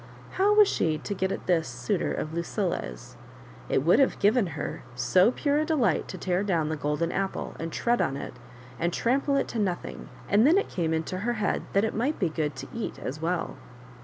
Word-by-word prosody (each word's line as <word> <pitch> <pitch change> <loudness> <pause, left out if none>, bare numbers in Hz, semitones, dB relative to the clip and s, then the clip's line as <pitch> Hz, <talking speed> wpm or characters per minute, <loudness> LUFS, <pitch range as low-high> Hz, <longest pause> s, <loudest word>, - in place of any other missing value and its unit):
How 405 +2 +3
was 420 -1 +7
she 160 - +1
to 200 - -4
get 190 0 -1
at - - -4
t)^is 170 -3 +2
suitor 120 0 -2
of 155 - -3
Lucilla's? 170 - -3 0.5
It - - +2
would 170 - +5
have 270 - +3
given 210 +1 +3
her - - -4
so 125 - +4
pure 285 +3 +1
a - - +2
delight 260 - +1
to - - -7
tear 180 0 0
down 170 -7 0
the 160 - -1
golden 150 +3 -1
apple, 195 0 -2
and 165 0 -4
tread 240 +7 +1
on 135 +1 0
it, - - -6 0.5
and 170 +1 +1
trample 275 +8 +1
it 275 - 0
to 230 - -3
nothing; 185 -4 -3 0.2
and 215 +6 +5
then 335 +5 +5
it 400 - 0
came 165 -3 -1
into 160 +3 -2
her 240 +4 0
head 215 -3 0
that 200 +2 +3
it 220 - -2
might 260 +8 0
be 180 - +1
good 155 -3 -2
to 130 - -7
eat 230 -2 -4
as 145 +4 -5
well. 170 +1 -2
185 Hz, 215 wpm, -27 LUFS, 160-235 Hz, 0.5 s, was